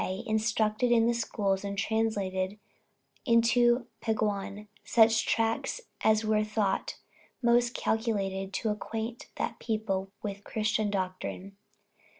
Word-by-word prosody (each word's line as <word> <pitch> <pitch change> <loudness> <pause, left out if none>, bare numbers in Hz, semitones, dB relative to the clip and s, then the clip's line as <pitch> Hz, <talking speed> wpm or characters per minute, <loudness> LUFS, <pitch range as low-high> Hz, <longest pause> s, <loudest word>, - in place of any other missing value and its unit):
instructed 215 +2 +1
in 230 -1 +5
the 235 - +3
schools 205 -4 -1
and 200 0 -4
translated 200 -3 -1 0.7
into 240 0 +4 0.2
Peguan 210 -2 -2 0.2
such 225 -1 +4
tracts 225 - 0 0.2
as 220 0 +3
were 215 0 +2
thought 215 -2 -1 0.5
most 240 0 +3
calculated 195 -4 -1
to 220 +3 -1
acquaint 225 +2 -4
that - - -3
people 195 -4 -2
with 200 -1 -5
Christian 215 -1 0
doctrine. 190 0 -4
215 Hz, 110 wpm, -29 LUFS, 200-225 Hz, 0.7 s, in